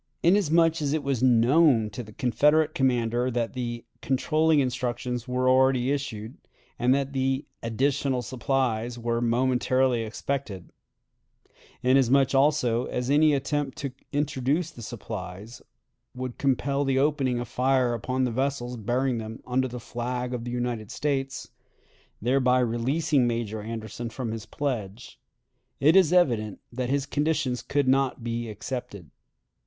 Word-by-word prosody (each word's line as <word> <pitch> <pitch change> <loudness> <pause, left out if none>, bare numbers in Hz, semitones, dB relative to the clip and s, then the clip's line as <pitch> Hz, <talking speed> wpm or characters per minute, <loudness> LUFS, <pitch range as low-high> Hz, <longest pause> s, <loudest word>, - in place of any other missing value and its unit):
Inasmuch 165 -3 +3
as 145 -1 0
it 155 -2 -1
was 135 -4 -1
known 125 -1 +4
to 115 - -6
the 110 -2 -11
Confederate 150 +7 +2
commander 125 -4 +1
that 120 -2 -2
the 120 -2 -4 0.2
"controlling 155 +5 +2
instructions" 125 -1 -2
were 125 0 0
already 130 0 +3
issued, 130 -4 -4 0.4
and 125 +1 +3
that 140 0 -2
the 135 +1 0 0.2
"additional 130 +2 0
supplies" 120 -2 -1
were 115 0 -1
momentarily 125 +1 +2
expected; 110 -3 -4 1.1
inasmuch, 130 +1 +4
also, 135 -4 +2
as 125 +2 -2
any 150 0 +5
attempt 140 0 -2
to 140 -2 -4 0.2
introduce 145 +3 0
the 120 - -12
supplies 105 -1 -7 0.5
would 125 -1 -6
compel 140 +1 +1
the 135 -1 +1
opening 135 -3 +1
of 120 - -4
fire 130 -1 +1
upon 130 +3 -1
the 125 - 0
vessels 125 -1 -2
bearing 120 +3 0
them 110 +1 -7
under 130 +1 0
the 125 0 -7
flag 125 +1 -4
of 120 -1 -4
the 120 - -4
United 120 -3 -3
States 135 -2 -3 0.7
thereby 125 +2 +2
releasing 130 +4 +1
Major 115 -2 -2
Anderson 115 +1 -6
from 115 0 -4
his 110 -2 -6
pledge 120 -3 -4 0.6
it 155 +5 +5
is 185 -4 +6
evident 120 - +2
that 125 0 -2
his 140 0 0
conditions 145 -4 0
could 140 +3 0
not 135 -2 +1
be 115 0 -3
accepted. 110 - -6
125 Hz, 140 wpm, -26 LUFS, 120-140 Hz, 1.1 s, is